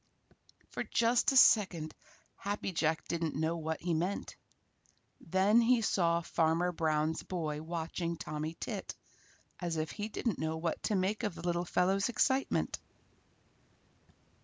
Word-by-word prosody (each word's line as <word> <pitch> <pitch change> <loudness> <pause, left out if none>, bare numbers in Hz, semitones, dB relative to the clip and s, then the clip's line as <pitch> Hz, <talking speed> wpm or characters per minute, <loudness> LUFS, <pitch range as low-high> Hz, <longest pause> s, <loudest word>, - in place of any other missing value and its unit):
For - - -3
just 235 +2 +2
a 270 - +3
second 180 -10 +5 0.4
Happy 200 -1 -3
Jack 160 -2 0
didn't 165 -2 -2
know 160 +3 0
what 160 0 -3
he 175 0 -1
meant. 175 +5 -2 0.8
Then 195 +6 +3
he 235 0 +3
saw 170 -4 +2
Farmer 165 +1 +1
Brown's 155 -1 0
boy 155 -5 -3
watching 170 +1 -3
Tommy 155 +2 -5
Tit - - -5 0.6
as 170 -2 -2
if 155 0 -2
he 210 0 -4
didn't 220 -1 -2
know 160 0 -1
what 165 0 -2
to 210 - +1
make 190 +3 0
of 210 -6 -2
the - - -9
little 175 0 0
fellow's 190 +5 +1
excitement. 265 +3 +1
170 Hz, 135 wpm, -32 LUFS, 160-200 Hz, 0.8 s, second